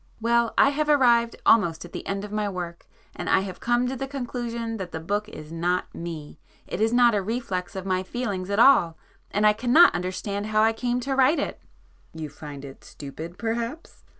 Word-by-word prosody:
"Well 235 Hz, 0 st, +1 dB
I -, -, +6 dB
have 300 Hz, +1 st, -1 dB
arrived 235 Hz, -5 st, +4 dB
almost 175 Hz, -7 st, +3 dB
at 175 Hz, -, -14 dB
the -, -, -6 dB
end 195 Hz, +1 st, -3 dB
of 205 Hz, -, -10 dB
my 210 Hz, -1 st, -1 dB
work 175 Hz, -3 st, -6 dB, 0.3 s
and 175 Hz, -, -4 dB
I -, -, +4 dB
have 190 Hz, -2 st, -7 dB
come 240 Hz, +1 st, +1 dB
to 260 Hz, -, -3 dB
the 270 Hz, +1 st, -4 dB
conclusion 240 Hz, -4 st, -4 dB
that 185 Hz, -4 st, -6 dB
the 160 Hz, -, -4 dB
book 205 Hz, +6 st, -2 dB
is 155 Hz, -5 st, -10 dB
not 175 Hz, +2 st, -1 dB
Me,—it 165 Hz, +3 st, -8 dB
is 220 Hz, +1 st, +3 dB
not 240 Hz, -1 st, +5 dB
a 205 Hz, -, +1 dB
reflex 200 Hz, -3 st, -3 dB
of 190 Hz, -1 st, -5 dB
my 185 Hz, -1 st, 0 dB
feelings 195 Hz, -2 st, -4 dB
at 200 Hz, -, -1 dB
all,—and 210 Hz, -3 st, +2 dB
I 210 Hz, -, +6 dB
cannot 250 Hz, +10 st, +5 dB
understand 200 Hz, +3 st, -3 dB
how 215 Hz, 0 st, +2 dB
I 225 Hz, +1 st, +3 dB
came 245 Hz, +2 st, -1 dB
to 270 Hz, +2 st, -2 dB
write 270 Hz, +4 st, +4 dB
it." -, -, -3 dB, 0.5 s
"You 155 Hz, -2 st, -5 dB
find 145 Hz, -1 st, -9 dB
it 135 Hz, -1 st, -12 dB
stupid 160 Hz, +5 st, -9 dB
perhaps?" 235 Hz, +7 st, -4 dB
210 Hz, 200 wpm, -25 LUFS, 180-240 Hz, 0.5 s, I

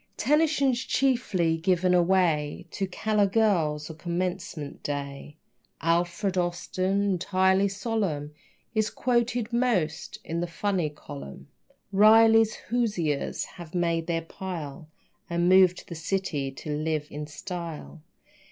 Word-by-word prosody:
Tennyson's 285 Hz, -1 st, +2 dB
chiefly 200 Hz, -11 st, +1 dB
given 180 Hz, +2 st, +2 dB
away 170 Hz, -5 st, +2 dB
To 195 Hz, -, -2 dB
callow 210 Hz, +2 st, +1 dB
girls 170 Hz, -8 st, +1 dB
on 160 Hz, -, -9 dB
commencement 175 Hz, -2 st, -4 dB
day. 140 Hz, 0 st, -5 dB, 0.4 s
Alfred 175 Hz, +3 st, 0 dB
Austin, 185 Hz, +3 st, -1 dB
entirely 190 Hz, 0 st, +2 dB
solemn, 195 Hz, -8 st, -2 dB, 0.4 s
Is 215 Hz, -1 st, +1 dB
quoted 240 Hz, -1 st, 0 dB
most 215 Hz, -11 st, 0 dB
in 165 Hz, +1 st, -3 dB
the 175 Hz, -, -1 dB
funny 180 Hz, -2 st, -1 dB
column. 145 Hz, -, -10 dB, 0.4 s
Riley's 220 Hz, +2 st, +6 dB
Hoosiers 205 Hz, -12 st, -1 dB
have 175 Hz, -1 st, -11 dB
made 170 Hz, -2 st, 0 dB
their 165 Hz, -1 st, -1 dB
pile 165 Hz, -4 st, -7 dB, 0.4 s
And 170 Hz, 0 st, +1 dB
moved 185 Hz, -1 st, +6 dB
to -, -, -11 dB
the -, -, -7 dB
city 165 Hz, -4 st, -2 dB
to 135 Hz, +3 st, -7 dB
live 155 Hz, 0 st, -1 dB
in 150 Hz, 0 st, -5 dB
style. 165 Hz, +1 st, -7 dB
180 Hz, 115 wpm, -27 LUFS, 160-205 Hz, 0.4 s, Riley's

